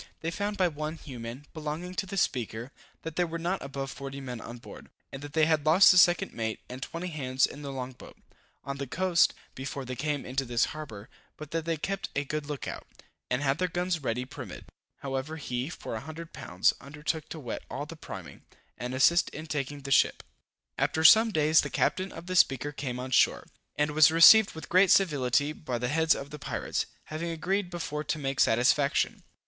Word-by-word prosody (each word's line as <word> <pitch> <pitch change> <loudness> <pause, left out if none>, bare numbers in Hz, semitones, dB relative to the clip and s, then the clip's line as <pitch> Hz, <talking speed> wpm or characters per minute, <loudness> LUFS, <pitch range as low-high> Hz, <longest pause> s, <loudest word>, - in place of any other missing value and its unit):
They 165 - -2
found 205 +3 -3
by 185 -2 +3
one 155 0 -4
Hugh 135 -6 -9
Man, 115 +5 -7
belonging 155 +3 -5
to 195 - -2
the 195 +1 -5
Speaker, 120 - -1 0.3
that 160 -1 -6
there 175 -1 +2
were 165 +1 -4
not 175 +3 -2
above 135 -1 -5
40 140 +1 -7
men 125 -3 -6
on 120 +1 -8
board, 120 - -12 0.2
and 135 - -7
that 145 0 -9
they 160 -1 +4
had 155 -2 +2
lost 165 +6 +7
the 180 - +4
second 175 +2 +4
mate 110 -1 -3
and 130 +1 -8
20 170 +5 -5
hands 130 -5 +1
in 145 - -8
the 140 -1 -5
long 130 -1 -5
boat, 125 - -14 0.5
on 140 0 -5
the 140 0 -4
coast, 180 +4 +2 0.2
before 135 0 -5
they 130 0 -5
came 145 +2 -2
into 135 +2 -1
this 120 -2 +1
harbor, 120 -9 -8 0.3
but 150 -1 -9
that 165 -1 -2
they 165 -1 -1
kept 195 +5 -3
a 145 - +1
good 150 +1 -4
look 145 -3 -5
out, - - -7 0.4
and 125 +3 0
had 135 +1 +1
their 185 - +2
guns 175 -2 -1
ready 125 -1 -2
primed. 130 - -9 0.4
However, 135 +3 -3
he, 125 -2 -3
for 170 - -7
a 110 - -3
hundred 160 +2 -9
pounds, 90 +1 +1
undertook 150 +2 -4
to 160 - -6
wet 125 -6 -5
all - - -4
the - - -9
priming, - - -9 0.4
and 125 +1 -4
assist 170 +7 +4
in 155 - -8
taking 145 -2 -4
the 135 - -6
ship. - - +3 0.6
After 160 - +1
some 220 +7 +8
days 155 -2 +4
the - - -4
captain 185 +1 0
of 165 - -9
the 185 +1 -4
Speaker 135 -4 +3
came 130 -4 -4
on 130 +1 -5
shore, - - +3 0.3
and 150 0 +1
was 155 0 +7
received 165 +6 +8
with 160 - -8
great 185 +2 +5
civility 145 -5 +3
by 130 -6 -4
the 125 +1 -2
heads 160 +2 +3
of 140 +1 -7
the 150 - -8
pirates, - - -2 0.2
having 160 +2 -5
agreed 180 +3 -1
before 165 -4 -4
to 155 - -1
make 135 -2 -3
satisfaction. 125 +5 +3
150 Hz, 210 wpm, -29 LUFS, 130-165 Hz, 0.6 s, some